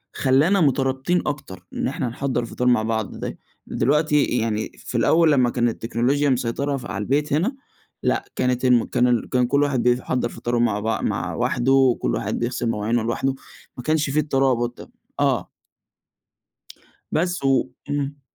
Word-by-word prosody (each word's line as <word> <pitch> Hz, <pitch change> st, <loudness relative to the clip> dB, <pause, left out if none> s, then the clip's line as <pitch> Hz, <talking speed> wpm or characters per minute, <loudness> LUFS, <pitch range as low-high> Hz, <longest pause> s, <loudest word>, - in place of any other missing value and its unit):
خلّانا 150 Hz, +9 st, +3 dB
مترابطين 135 Hz, +4 st, +1 dB
أكتر، 140 Hz, -11 st, -5 dB
إن -, -, -1 dB
إحنا -, -, -2 dB
نحضّر 125 Hz, +1 st, -2 dB
الفطار 125 Hz, +1 st, -3 dB
ده 125 Hz, -, +6 dB
مع 110 Hz, -, +1 dB
بعض 110 Hz, -2 st, -2 dB
دا -, -, -4 dB, 0.3 s
دلوقتي 150 Hz, +1 st, +2 dB
يعني 110 Hz, -3 st, -1 dB
في -, -, -5 dB
الأول 165 Hz, -1 st, +4 dB
لمّا 130 Hz, -4 st, +3 dB
كان 120 Hz, -1 st, +1 dB
التكنولوجيا 120 Hz, +6 st, 0 dB
مسيطرة 135 Hz, +3 st, -1 dB
ف 125 Hz, -, -9 dB
على 100 Hz, -, -4 dB
البيت 145 Hz, +5 st, 0 dB
هنا، 190 Hz, -, +1 dB, 0.5 s
لأ -, -, 0 dB
كانت 125 Hz, 0 st, 0 dB
الم 125 Hz, -2 st, +5 dB
كان 120 Hz, -2 st, +1 dB
كان 125 Hz, -1 st, +2 dB
كلّ 140 Hz, +3 st, +2 dB
واحد 140 Hz, -4 st, 0 dB
بيحضّر 125 Hz, 0 st, +1 dB
فطاره 120 Hz, 0 st, -2 dB
مع 115 Hz, -4 st, +1 dB
بع 110 Hz, 0 st, -1 dB
مع -, -, -2 dB
وحده، 130 Hz, 0 st, +3 dB
كلّ -, -, 0 dB
واحد -, -, -2 dB
بيغسل 120 Hz, 0 st, -1 dB
مواعينه 115 Hz, +1 st, 0 dB
لوحده، 130 Hz, +4 st, -1 dB, 0.4 s
ما 125 Hz, -, -6 dB
كانش 155 Hz, 0 st, +1 dB
في 145 Hz, +3 st, +1 dB
الترابط 130 Hz, -5 st, +1 dB
ده. -, -, -13 dB, 0.3 s
آه. -, -, +1 dB, 1.6 s
بس 175 Hz, 0 st, 0 dB
و 135 Hz, -1 st, +2 dB, 0.2 s
امم. 145 Hz, 0 st, -3 dB
130 Hz, 165 wpm, -22 LUFS, 120-145 Hz, 1.6 s, ده